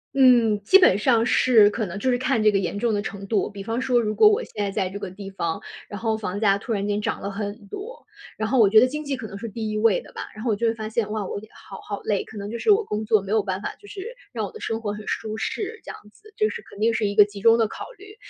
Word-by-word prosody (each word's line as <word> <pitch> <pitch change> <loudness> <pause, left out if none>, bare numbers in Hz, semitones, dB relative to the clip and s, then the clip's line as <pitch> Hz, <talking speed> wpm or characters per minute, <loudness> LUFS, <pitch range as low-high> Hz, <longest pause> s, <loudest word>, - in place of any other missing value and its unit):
嗯， 240 -6 +5
基 380 - +7
本 365 - +5
上 230 0 +3
是 225 -4 +5
可 215 -2 -2
能 180 - -6
就 255 +5 0
是 245 - +1
看 255 -3 +1
这 215 - +5
个 195 - +2
严 195 +2 -3
重 230 0 0
的 205 - 0
程 200 -1 -6
度。 200 0 0
比 200 -1 -8
方 230 +4 -2
说 250 -2 +2
如 215 -2 -1
果 425 - +7
我 425 +4 +1
现 210 - -5
在 200 - -1
在 190 -1 -1
这 200 +2 -7
个 185 - -5
地 195 +1 -10
方， 170 -4 -3 0.3
然 205 - -6
后 225 -1 0
房 205 -2 -4
价 200 -3 +4
突 200 +4 -6
然 200 -1 -1
间 205 0 -1
涨 - - -2
了 200 - -5
很 205 +1 -5
多， 445 - -9 0.3
然 220 - -1
后 250 +2 +2
我 210 - +6
觉 215 +2 +7
得 240 - +6
经 300 +4 -4
济 280 -2 -3
可 220 - -7
能 195 - -10
是 225 +3 -6
第 215 0 -4
1 - - -3
位 215 -2 +3
的 - - -16
吧。 - - -6
然 215 - -8
后 235 - +1
我 210 - +2
就 230 +3 0
会 225 - +2
发 220 -1 -5
现， 220 -1 -1
哇， 215 -2 -2
我 200 - -5
好 - - -12
好 205 - -5
累， 205 -2 0
可 220 - -12
能 200 - -5
就 235 - -5
是 - - -1
我 425 +1 +5
工 210 - -3
作 215 -3 +3
没 195 - -6
有 220 - +3
办 190 -1 -3
法， - - -5
就 410 - -16
是 430 +6 -8 0.2
让 - - -3
我 - - -8
的 440 - -11
生 225 - -3
活 205 -2 -3
很 210 - -7
舒 215 -1 -3
适， 425 - -4
这 - - -7
样 - - -10
子， 430 - -19
这 430 - +3
是 470 +1 -6
肯 200 - -15
定 230 +2 +2
是 215 -2 0
一 200 - -3
个 210 - +8
集 205 -1 -10
中 230 +2 +6
的 225 -2 +2
考 - - -8
虑。 410 +2 -14
220 Hz, 340 characters per minute, -24 LUFS, 205-245 Hz, 0.3 s, 个